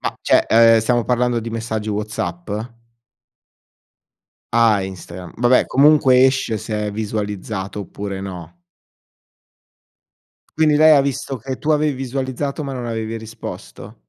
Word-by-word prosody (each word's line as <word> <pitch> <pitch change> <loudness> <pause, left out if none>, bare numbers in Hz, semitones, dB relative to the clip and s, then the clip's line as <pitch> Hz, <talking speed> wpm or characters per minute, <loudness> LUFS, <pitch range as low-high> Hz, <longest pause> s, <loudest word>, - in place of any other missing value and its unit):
Ma - - -3
cioè, - - +3
ehm, 115 0 +6
stiamo 120 +1 +1
parlando 125 +1 +1
di 115 0 -5
messaggi 110 -1 -4
Whatsapp? 105 -5 -4 2.1
Ah 115 -4 +4
Instagram, 90 -1 -9
vabbè 120 +2 +3
comunque 135 -2 +5
esce 130 -5 -1
se 110 0 -4
è - - -5
visualizzato 105 -2 -4
oppure 100 0 -6
no. 90 -4 -8 2.1
Quindi 155 -2 +4
lei 155 0 +7
ha 140 - +5
visto 135 -1 -3
che 130 +3 -5
tu 155 - -3
avevi 150 -1 +2
visualizzato 135 +2 -4
ma 135 -2 -5
non 125 -1 -5
avevi 115 -1 -4
risposto? 110 0 -9
115 Hz, 130 wpm, -19 LUFS, 105-130 Hz, 2.1 s, lei